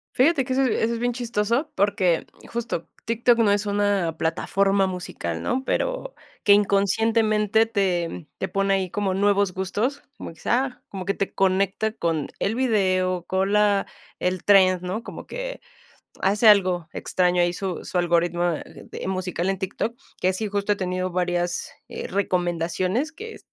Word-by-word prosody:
Fíjate 275 +1 +4
que 255 - -3
eso 270 +1 +2
es 255 - +2
eso 230 +1 +1
es 230 - -3
bien 245 0 0
chistoso, 235 +4 -1
porque 185 -4 +2 0.3
justo 235 -8 -3 0.2
TikTok 235 +1 +2
no 215 -3 +4
es 205 +1 +1
una 200 -5 0
plataforma 195 +4 +1
musical, 130 - -4
¿no? 260 +2 -1
Pero - - -2 0.3
que 205 - +4
inconscientemente 215 +2 +3
te 180 -6 -1
te - - -2
pone 195 0 +1
ahí 190 -1 -1
como 195 0 -1
nuevos 200 -1 +2
gustos, 210 +10 -2 0.2
como - - -8
quizás, 250 - 0
como 190 -2 -6
que 195 - +1
te 195 - -3
conecta 195 +3 +1
con 165 -7 -1
el 220 +3 0
video, 185 -7 +1
con 190 +2 0
la 205 -1 +3 0.3
el 180 -1 -1
trend, 185 -3 +5
¿no? 185 +5 -4
Como - - -9
que - - -6 0.6
hace 210 +3 +4
algo 185 -5 +4
extraño 180 -1 +1
ahí 175 - +2
su 185 -1 -4
su - - -5
algoritmo 175 0 +1 0.2
de - - -9
musical 185 -1 -2
en 195 -1 0
Tik 190 0 -5
Tok, 230 +2 -1 0.3
que 185 +1 +2
sí 210 +3 -3
justo 205 +1 0
he - - -1
tenido 185 -1 -2
varias, 175 -1 -1 0.2
eh, - - -6
recomendaciones 180 - -1
que 445 +6 -9
195 Hz, 165 wpm, -24 LUFS, 180-225 Hz, 0.6 s, trend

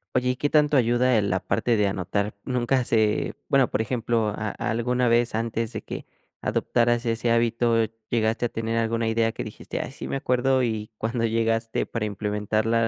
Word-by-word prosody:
Oye, 125 0 +2
¿y 125 - +1
qué 145 - 0
tanto 150 -1 +3
ayuda, 125 0 +3
eh, - - +2
la 95 -2 0
parte 115 +5 0
de 105 - +3
anotar? 100 +2 -2
Nunca 125 +1 +1
se, 110 -3 +1
bueno, 135 -3 +3
por - - -1
ejemplo, 115 -2 0
¿a 105 -1 -4
a - - -1
alguna 125 +2 +1
vez 120 -1 +2
antes 115 0 -1
de - - -5
que - - -7 0.3
adoptaras 120 0 +1
ese 115 0 0
hábito 115 0 +2 0.3
llegaste 115 0 +1
a - - -14
tener 115 0 -3
alguna 115 0 0
idea 115 0 +2
que - - -4
dijiste: 110 - -6
"Ay, - - -4
sí 140 - -7
me - - -2
acuerdo", 130 0 +2
y 110 -3 -2
cuando 115 +1 -1
llegaste 115 0 0
para 115 -2 -3
implementarla 105 +2 0
115 Hz, 190 wpm, -25 LUFS, 110-120 Hz, 0.3 s, tanto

